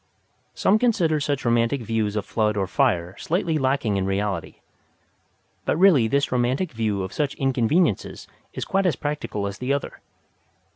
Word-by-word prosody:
Some 210 +3 +3
consider 175 -11 +2
such 145 -2 -2
romantic 120 +2 +1
views 110 -2 -1
of 105 -1 -2
flood 105 -1 0
or 95 - +1
fire 95 -6 0
slightly 165 -2 0
lacking 130 -6 0
in 95 0 -1
reality. 95 -2 -2 1.1
But - - 0
really 165 -11 +5
this 140 +4 0
romantic 125 +7 0
view 110 -4 -1
of 95 - -6
such 145 -3 -1
inconveniences 135 - 0 0.2
is - - -5
quite 195 -1 +1
as 170 - +1
practical 145 -8 -3
as 100 +2 -5
the 125 +2 -2
other. 140 0 -3
125 Hz, 155 wpm, -23 LUFS, 105-150 Hz, 1.1 s, really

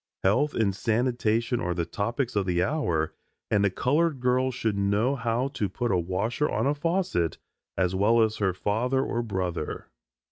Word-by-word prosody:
Health 130 +10 +2
and 100 -4 +1
sanitation 115 +1 0
are 90 0 -1
the 85 -1 -1
topics 115 - -2
of 100 -2 +1
the 90 0 +2
hour 90 - 0 0.4
and 105 -1 +3
a 100 - +4
colored 145 - +1
girl 125 +1 +2
should 115 -4 -1
know 100 +7 +1
how 120 +1 -1
to 105 -8 -2
put 120 +5 -2
a 95 - +3
washer 100 - -1
on - - 0
a 140 - +3
faucet 150 - 0 0.4
as 95 -1 +1
well 110 +4 +4
as 110 0 0
her 95 -2 +1
father 120 +8 0
or 120 - -1
brother. 95 -8 -3
110 Hz, 175 wpm, -27 LUFS, 95-125 Hz, 0.4 s, a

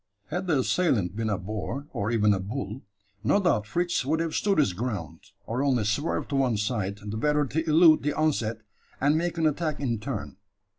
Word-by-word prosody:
Had 180 +3 -3
the 160 -5 +3
assailant 115 - +1
been 110 0 -1
a 100 - 0
boar, 110 +9 -5
or 100 +1 -1
even 105 -3 +3
a 95 - -1
bull, 110 +4 -5 0.4
no 200 - +3
doubt 165 - +1
Fritz 175 +7 0
would 155 +5 0
have 165 -1 -1
stood 200 -1 +1
his 140 -12 +3
ground, 95 -6 -4 0.3
or 120 +4 -2
only 130 -5 +2
swerved 110 +10 -1
to 145 - -2
one 130 -5 +2
side, 105 -2 -1
the 105 +1 -4
better 150 +4 +2
to 160 +4 -2
elude 160 0 +6
the 150 +1 0
onset, 115 -8 0 0.4
and 145 +3 +3
make 170 +1 -1
an 165 - +1
attack 155 0 0
in 120 -6 -1
turn. 110 -5 -5
130 Hz, 200 wpm, -27 LUFS, 105-155 Hz, 0.4 s, elude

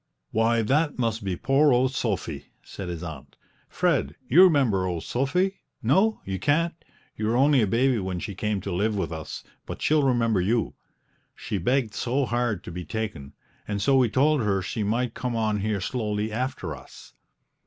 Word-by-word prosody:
"Why, 115 +1 +2
that 145 +7 +1
must 115 -3 -1
be 95 -2 -2
poor 135 - +3
old 130 +1 +2
Sophy!" 85 - -3 0.2
said 95 -3 -7
his 85 -1 -5
aunt. 80 -5 -9 0.3
"Fred, - - 0
you 165 +9 +6
remember 130 - +3
old 85 -2 -3
Sophy 180 +10 0 0.2
no, 215 +3 +3
you 95 -1 -3
can't; 165 - +1 0.4
you 105 - -2
were 115 +2 +1
only 140 0 +4
a 105 - +2
baby 120 +3 +2
when 95 -2 -3
she 100 - -5
came 105 +1 -2
to 100 - -5
live 105 +4 0
with 95 - -2
us, 80 -1 -6 0.2
but - - -6
she'll 155 0 +3
remember 115 -7 +2
you. 110 +5 0 0.6
She 100 - -4
begged 120 +3 0
so 130 +6 0
hard 120 -5 -1
to - - -8
be 90 +1 -5
taken, 100 -11 -5 0.3
and 100 -1 -2
so 135 +7 +3
we 130 -3 +4
told 145 +4 +3
her 100 -3 0
she 110 - -3
might 115 +3 0
come 125 -2 -3
on 110 -2 0
here 105 0 -1
slowly 105 0 -2
after 115 - -3
us." 65 - -14
115 Hz, 185 wpm, -25 LUFS, 100-130 Hz, 0.6 s, you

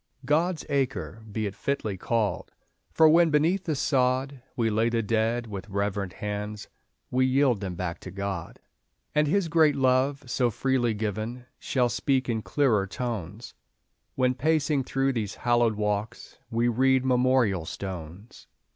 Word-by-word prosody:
"God's 160 +5 +1
Acre" 135 -5 -2
be 110 +1 -2
it 100 - -3
fitly 110 -1 -2
called, 105 0 -1 0.4
For 160 - +5
when, 165 +2 +5
beneath 165 +6 +2
the 155 - 0
sod, 130 0 0
We 115 -2 +1
lay 110 +2 +2
the 115 -1 0
dead 115 +2 0
with 105 -2 -7
reverent 100 -1 -2
hands, 105 0 -5 0.4
We 130 +1 +3
yield 130 -4 +3
them 95 -3 -4
back 85 -1 -4
to - - -9
God. 95 -2 -5 0.5
And 150 0 +3
His 190 +3 +1
great 160 -2 +4
love, 135 +2 +2
so 120 0 +1
freely 120 0 0
given, 110 +4 -4
Shall 125 -2 +1
speak 130 +2 0
in 115 -2 -1
clearer 105 -1 +1
tones, 110 -2 -5 0.6
When, 130 -1 +2
pacing 150 0 +1
through 135 +1 0
these 110 -4 -3
hallowed 120 -2 +2
walks, 105 +2 -3
We 115 +1 +1
read 130 +2 +3
memorial 125 -8 +2
stones. 95 +2 -8
120 Hz, 145 wpm, -27 LUFS, 105-135 Hz, 0.6 s, For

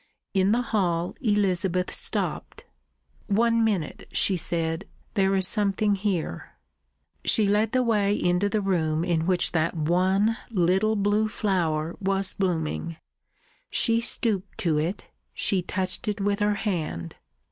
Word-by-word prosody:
In 195 +1 +3
the 240 +2 +2
hall 175 -7 -1
Elizabeth 190 -5 +1
stopped. - - -1 0.6
"One 230 +2 +2
minute," 195 -9 -2
she 195 - +2
said. 165 +1 -2 0.3
"There 195 -2 +2
is 190 -1 +2
something 205 0 +1
here." 195 -4 -3 0.7
She 215 - +3
led 210 +2 +2
the 255 -1 +2
way 210 -3 +2
into 180 +2 +1
the 210 +1 0
room 165 -5 0
in 165 -1 0
which 180 -1 +1
that 165 0 0
one 185 +7 +2
little 190 +2 +2
blue 205 +1 +1
flower 170 -7 -1
was 195 -1 0
blooming. 165 -3 -2 0.7
She 230 -1 +2
stooped 210 -4 0
to 160 -4 +1
it, 170 +6 -3 0.3
she 195 -3 +1
touched 185 +5 -3
it 210 -1 -1
with 200 +1 0
her 205 0 +2
hand. 160 - -3
195 Hz, 135 wpm, -25 LUFS, 175-210 Hz, 0.7 s, In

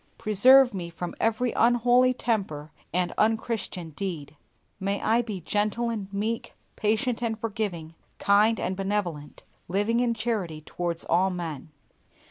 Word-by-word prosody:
Preserve 245 +4 +6
me 175 -3 -4
from 175 +1 -6
every 225 +2 +1
unholy 245 +2 +4
temper 190 -12 -2 0.2
and 180 0 0
unchristian 215 -6 -1
deed. 155 -4 -5 0.4
May 200 +1 -1
I 225 +2 +2
be 210 -6 -6
gentle 210 +6 0
and 200 -4 -5
meek, 215 +3 -3 0.2
patient 225 +3 0
and 225 -2 -2
forgiving, 200 -8 -4 0.2
kind 210 +3 +3
and 185 - -2
benevolent, 190 -7 -3 0.2
living 205 +6 +1
in 240 -1 +1
charity 210 -9 -2
towards 170 +1 -3
all 190 +2 +2
men. 165 -5 -5
205 Hz, 130 wpm, -26 LUFS, 175-230 Hz, 0.4 s, Preserve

